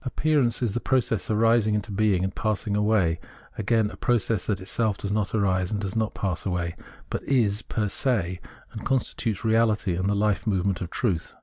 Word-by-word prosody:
Appearance 130 Hz, -3 st, +1 dB
is 110 Hz, -5 st, 0 dB
the 120 Hz, -, -1 dB
process 120 Hz, -6 st, 0 dB
of 110 Hz, -, +1 dB
arising 115 Hz, -1 st, +3 dB
into 105 Hz, 0 st, -3 dB
being 100 Hz, -2 st, +2 dB
and 95 Hz, 0 st, -2 dB
passing 105 Hz, -1 st, -1 dB
away 105 Hz, -6 st, +2 dB, 0.4 s
again, 110 Hz, 0 st, +1 dB
a -, -, -9 dB
process 115 Hz, -3 st, 0 dB
that 100 Hz, -4 st, 0 dB
itself 105 Hz, +2 st, -1 dB
does 100 Hz, -, -4 dB
not 105 Hz, 0 st, 0 dB
arise 95 Hz, -3 st, +1 dB
and 105 Hz, -, -1 dB
does 100 Hz, -1 st, -4 dB
not 110 Hz, -2 st, -1 dB
pass 90 Hz, -4 st, -2 dB
away, 90 Hz, -3 st, -2 dB, 0.4 s
but -, -, -2 dB
is 110 Hz, -5 st, +2 dB
fer 105 Hz, -2 st, 0 dB
se, 100 Hz, -6 st, 0 dB, 0.3 s
and 110 Hz, -, -7 dB
constitutes 120 Hz, -5 st, -1 dB
reality 110 Hz, -4 st, +2 dB
and 95 Hz, +3 st, 0 dB
the 105 Hz, -, +1 dB
life 105 Hz, 0 st, +1 dB
movement 95 Hz, -3 st, 0 dB
of 90 Hz, -, -4 dB
truth. 90 Hz, -8 st, -2 dB
105 Hz, 195 wpm, -25 LUFS, 95-115 Hz, 0.4 s, arising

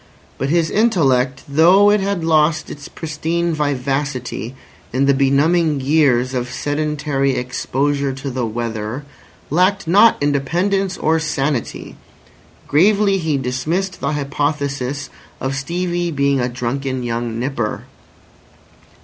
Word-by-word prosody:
But 135 Hz, -, -1 dB
his 165 Hz, 0 st, +1 dB
intellect, 135 Hz, -, +2 dB
though 175 Hz, +8 st, +5 dB
it 210 Hz, -, +3 dB
had 195 Hz, -3 st, -2 dB
lost 155 Hz, -1 st, +2 dB
its 145 Hz, -1 st, -9 dB
pristine 165 Hz, +2 st, -2 dB
vivacity 135 Hz, -4 st, -2 dB, 0.4 s
in 130 Hz, +3 st, +1 dB
the 140 Hz, -, +4 dB
benumbing 145 Hz, +3 st, +2 dB
years 130 Hz, -3 st, +2 dB
of 125 Hz, -1 st, -2 dB
sedentary 145 Hz, -2 st, -1 dB
exposure 140 Hz, +3 st, -1 dB
to 135 Hz, +1 st, -5 dB
the 125 Hz, 0 st, -2 dB
weather, 115 Hz, +2 st, -4 dB, 0.5 s
lacked 185 Hz, +3 st, +2 dB
not 205 Hz, +7 st, +6 dB
independence 175 Hz, +8 st, 0 dB
or 160 Hz, +1 st, +1 dB
sanity. 150 Hz, -5 st, -3 dB, 0.7 s
Gravely 200 Hz, +5 st, +3 dB
he 160 Hz, -4 st, 0 dB
dismissed 155 Hz, +9 st, -2 dB
the 140 Hz, +2 st, -1 dB
hypothesis 140 Hz, -2 st, -2 dB, 0.3 s
of 135 Hz, 0 st, -2 dB
Stevie 175 Hz, +5 st, -2 dB
being 140 Hz, -3 st, +1 dB
a 125 Hz, 0 st, 0 dB
drunken 130 Hz, +1 st, -3 dB
young 115 Hz, -1 st, -3 dB
nipper. 120 Hz, -4 st, -2 dB
145 Hz, 115 wpm, -19 LUFS, 130-165 Hz, 0.7 s, not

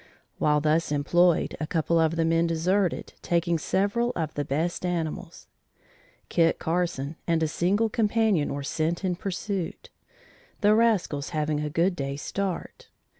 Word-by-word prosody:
While 150 Hz, 0 st, +3 dB
thus 155 Hz, +1 st, +1 dB
employed, 170 Hz, +4 st, +2 dB
a 155 Hz, -, -3 dB
couple 165 Hz, +1 st, +1 dB
of 160 Hz, 0 st, +2 dB
the 165 Hz, -1 st, +1 dB
men 165 Hz, +1 st, +2 dB
deserted 180 Hz, +3 st, 0 dB
taking 170 Hz, -1 st, +1 dB
several 205 Hz, +9 st, 0 dB
of 160 Hz, -2 st, -2 dB
the 145 Hz, -, -2 dB
best 160 Hz, +7 st, -2 dB
animals. 170 Hz, -3 st, -3 dB, 0.8 s
Kit 165 Hz, -1 st, +2 dB
Carson 165 Hz, -3 st, -2 dB
and 165 Hz, -1 st, +2 dB
a -, -, +2 dB
single 195 Hz, +8 st, +1 dB
companion 215 Hz, -6 st, +1 dB
were 140 Hz, -, -4 dB
sent 165 Hz, +6 st, -1 dB
in 180 Hz, -1 st, 0 dB
pursuit, 195 Hz, 0 st, -4 dB, 0.7 s
the 210 Hz, 0 st, +5 dB
rascals 210 Hz, -11 st, +1 dB
having 150 Hz, 0 st, 0 dB
a 150 Hz, 0 st, -2 dB
good 175 Hz, +5 st, +1 dB
day's 140 Hz, -1 st, -4 dB
start. 195 Hz, -3 st, -4 dB
170 Hz, 145 wpm, -26 LUFS, 155-190 Hz, 0.8 s, the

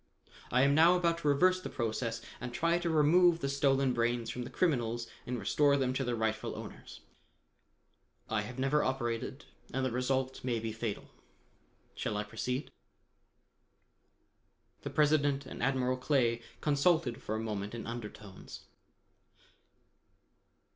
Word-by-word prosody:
I 125 Hz, +2 st, +4 dB
am 140 Hz, 0 st, +4 dB
now 165 Hz, +4 st, +6 dB
about 170 Hz, -2 st, +1 dB
to 150 Hz, -, -2 dB
reverse 185 Hz, +6 st, +4 dB
the -, -, -5 dB
process 115 Hz, 0 st, -2 dB, 0.2 s
and 125 Hz, 0 st, -5 dB
try 170 Hz, +6 st, +1 dB
to 175 Hz, -1 st, -1 dB
remove 165 Hz, +3 st, +5 dB
the 140 Hz, -, -2 dB
stolen 135 Hz, -1 st, +2 dB
brains 120 Hz, -1 st, 0 dB
from 125 Hz, -, -5 dB
the -, -, -7 dB
criminals 120 Hz, -9 st, 0 dB, 0.2 s
and 125 Hz, 0 st, -2 dB
restore 140 Hz, +7 st, +3 dB
them 130 Hz, -2 st, 0 dB
to 135 Hz, -, -1 dB
their 125 Hz, -1 st, -1 dB
rightful 110 Hz, -1 st, -2 dB
owners. -, -, -10 dB, 1.3 s
I 110 Hz, -1 st, 0 dB
have 120 Hz, +4 st, -7 dB
never 135 Hz, +3 st, +2 dB
operated 120 Hz, -3 st, -2 dB, 0.3 s
and 130 Hz, +1 st, -1 dB
the 130 Hz, -, -1 dB
result 130 Hz, +1 st, -1 dB
may 120 Hz, -3 st, 0 dB
be 110 Hz, 0 st, -3 dB
fatal. 110 Hz, -1 st, -5 dB, 0.8 s
Shall 105 Hz, -, -3 dB
I 105 Hz, -, -1 dB
proceed?" 125 Hz, +5 st, -4 dB, 2.1 s
The -, -, -5 dB
President 145 Hz, -2 st, +2 dB
and -, -, -8 dB
Admiral 130 Hz, -1 st, +1 dB
Clay 125 Hz, -3 st, +1 dB, 0.2 s
consulted 145 Hz, -4 st, +2 dB
for 110 Hz, -, -3 dB
a -, -, -2 dB
moment 105 Hz, -1 st, -4 dB
in 115 Hz, -, -6 dB
undertones. 105 Hz, -4 st, -8 dB
130 Hz, 140 wpm, -32 LUFS, 115-145 Hz, 2.1 s, now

